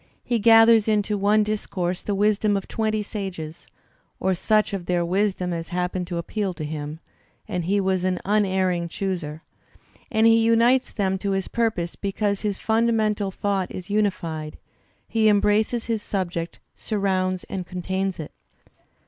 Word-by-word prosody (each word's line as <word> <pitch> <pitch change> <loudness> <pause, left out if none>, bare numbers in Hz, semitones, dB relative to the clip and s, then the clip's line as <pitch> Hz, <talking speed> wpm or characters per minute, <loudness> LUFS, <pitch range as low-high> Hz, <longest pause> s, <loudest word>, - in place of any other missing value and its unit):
He 240 -2 0
gathers 225 0 +6
into 210 -1 +1
one 205 +2 +3
discourse 190 -4 -2
the 205 - -2
wisdom 205 0 +2
of 195 - -5
twenty 215 -1 -1
sages 185 -7 -6 0.5
(or 190 - +1
such 215 +3 +1
of 185 -3 -4
their 175 -1 +1
wisdom 185 -1 0
as 165 -1 -4
happened 180 0 -2
to 175 -1 -3
appeal 190 +2 -2
toUm, 150 -1 -5 0.5
and 180 -5 -3
he 200 +3 +2
was 190 -2 0
an 185 -1 +1
unerring 190 -4 +1
chooser), 170 -4 -4 0.7
and 220 0 +2
he 225 0 +6
unites 235 +3 +3
them 190 -3 -1
to 200 0 -1
his 195 -1 -1
purpose 220 -8 -1
because 200 0 -1
his 205 -3 -1
fimdamental 220 -3 +1
thought 195 -1 -1
is 185 +2 -8
unified; 165 -7 -1 0.5
he 220 -1 +3
embraces 210 +3 +2
his 225 -2 -1
subject, 175 -5 -3 0.2
surrounds 185 -3 -1
and 185 -2 -5
contains 190 +1 -2
it. 155 - -6
195 Hz, 150 wpm, -24 LUFS, 180-215 Hz, 0.7 s, gathers